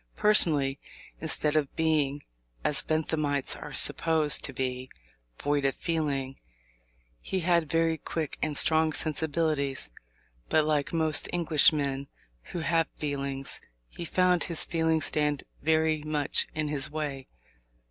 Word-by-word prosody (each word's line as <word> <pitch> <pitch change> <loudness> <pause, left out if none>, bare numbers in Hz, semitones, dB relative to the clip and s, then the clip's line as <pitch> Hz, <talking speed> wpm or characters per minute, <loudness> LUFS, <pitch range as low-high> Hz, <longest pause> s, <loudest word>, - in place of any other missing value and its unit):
Personally, 150 -10 +3 0.4
instead 155 -1 +1
of 150 -3 0
being, 150 -3 0 0.4
as 145 - +3
Benthamites 155 -3 -1
are - - -9
supposed 160 -3 +3
to - - -4
be, 130 -1 -4 0.5
void 145 0 0
of 135 -1 +1
feeling, 140 -5 -2 0.8
he 190 - -2
had 170 -2 +1
very 165 0 +1
quick 160 -3 -4
and 150 -2 0
strong 160 -1 +3
sensibilities. 150 - -1 0.6
But, 155 -1 +3
like 150 -2 0
most 160 -2 +1
Englishmen 145 -4 +2 0.4
who 175 - -5
have 165 0 +1
feelings, 140 -2 -3 0.3
he - - -8
found 180 +1 +2
his 170 -3 -1
feelings 160 -1 +1
stand 150 -2 0 0.2
very 160 0 +1
much 150 -2 +1
in 155 -1 -1
his 145 -2 -1
way. 145 -3 -5
155 Hz, 125 wpm, -28 LUFS, 140-160 Hz, 0.8 s, Personally